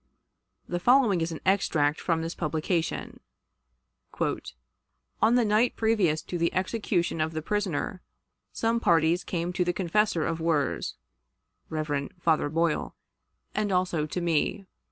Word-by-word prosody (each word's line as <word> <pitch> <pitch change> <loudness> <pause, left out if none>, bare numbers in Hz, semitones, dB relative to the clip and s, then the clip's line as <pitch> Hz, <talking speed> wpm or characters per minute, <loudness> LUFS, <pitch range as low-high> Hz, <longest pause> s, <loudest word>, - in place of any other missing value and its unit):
The 175 - -2
following 235 -4 +4
is 165 +1 -1
an 160 - -6
extract 160 -6 +2
from 165 -2 0
this 165 +1 -3
publication: 160 +1 -2 1.0
"On 65 - -3
the 245 -2 +4
night 215 +3 +2
previous 205 -9 +2
to 175 - -4
the 170 0 +2
execution 185 -4 0
of 160 +1 -1
the 155 - -3
prisoner, 185 -2 -2 0.5
some 230 +1 0
parties 170 -3 +3
came 175 0 -3
to 180 - +1
the 175 0 0
confessor 185 -1 +1
of 165 0 -2
Wirz 160 - 0 0.7
(Rev. 150 -3 -2
Father 160 -3 +2
Boyle) 165 +1 0 0.6
and 210 -1 0
also 180 -4 +1
to 180 - -3
me. 170 +4 0
170 Hz, 135 wpm, -27 LUFS, 160-195 Hz, 1.0 s, following